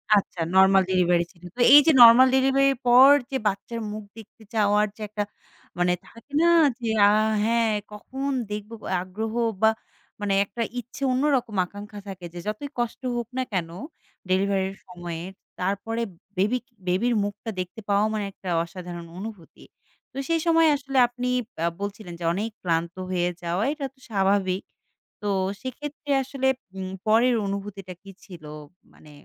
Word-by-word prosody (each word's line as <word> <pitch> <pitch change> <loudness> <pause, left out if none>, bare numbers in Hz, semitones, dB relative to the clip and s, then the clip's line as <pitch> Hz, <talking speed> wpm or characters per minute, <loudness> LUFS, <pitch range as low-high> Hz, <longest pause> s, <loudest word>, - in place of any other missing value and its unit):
আচ্ছা, 195 -3 -1 0.2
normal 190 0 +6
delivery 175 -2 +3
ছিল। 175 -2 -25
তো - - -14
এই 290 - +12
যে - - +8
নরমাল 240 +2 +10
ডেলিভারি 270 +1 +3
এর - - -12
পর 255 +3 +8 0.2
যে 270 - 0
বাচ্চার 205 +4 -3
মুখ 215 0 -6
দেখতে 220 0 -14
চাওয়ার 210 -1 +3
যে 220 - -14
একটা, 210 0 -2 0.6
মানে 180 0 +3
থাকে 230 +5 -17
না? - - +4 0.3
যে 235 - -4 0.2
আ - - +6 0.4
হ্যাঁ, 230 0 +2 0.2
কখন 265 +6 -5 0.2
দেখব? 210 +1 -5 0.3
আগ্রহ 215 +5 -5 0.3
বা 220 - +6 0.5
মানে 205 -1 0
একটা 200 +4 -7 0.2
ইচ্ছে, 245 +3 -11
অন্যরকম 255 -4 +1
আকাঙ্খা 205 +2 -10
থাকে 190 -2 -8
যে, 175 - -7
যতই 215 +7 -4
কষ্ট 240 +1 -2
হোক 240 -2 -3
না 260 - +1
কেন 175 -3 -1 0.6
ডেলিভারি 195 +1 +2
এর 195 - -13
সময়ে? 175 -2 -7 0.4
তারপরে 200 +5 -2 0.4
বেবিক 225 +6 +1 0.2
বেবির 215 +7 +1
মুখটা 205 +2 -5
দেখতে 180 +4 -5
পাওয়া 200 +1 +3
মানে 215 - -1
একটা 190 - -13 0.2
অসাধারণ 175 -1 -8
অনুভূতি। 200 -4 -9 0.5
তো - - -12
সেই 330 - +2
সময় 330 -1 +5
আসলে 270 -1 -4
আপনি 245 +1 -5 0.4
আ - - +3
বলছিলেন 200 -3 -6
যে, - - -7
অনেক 210 +5 -2
ক্লান্ত 170 -1 -1 0.2
হয়ে 175 -1 +1 0.2
যাওয়া 175 +5 -1
এটা 295 -2 -5
তো - - -30
স্বাভাবিক। 195 -2 +1 0.6
তো 210 - -3 0.3
সেক্ষেত্রে 290 +3 -6
আসলে 265 0 -2 0.3
উম 185 -1 -4 0.2
পরের 230 +3 +4
অনুভূতিটা 195 -1 -5
কি 195 - -11
ছিল? 175 -5 -12 0.5
মানে 150 - -17
210 Hz, 160 wpm, -25 LUFS, 185-240 Hz, 0.6 s, এই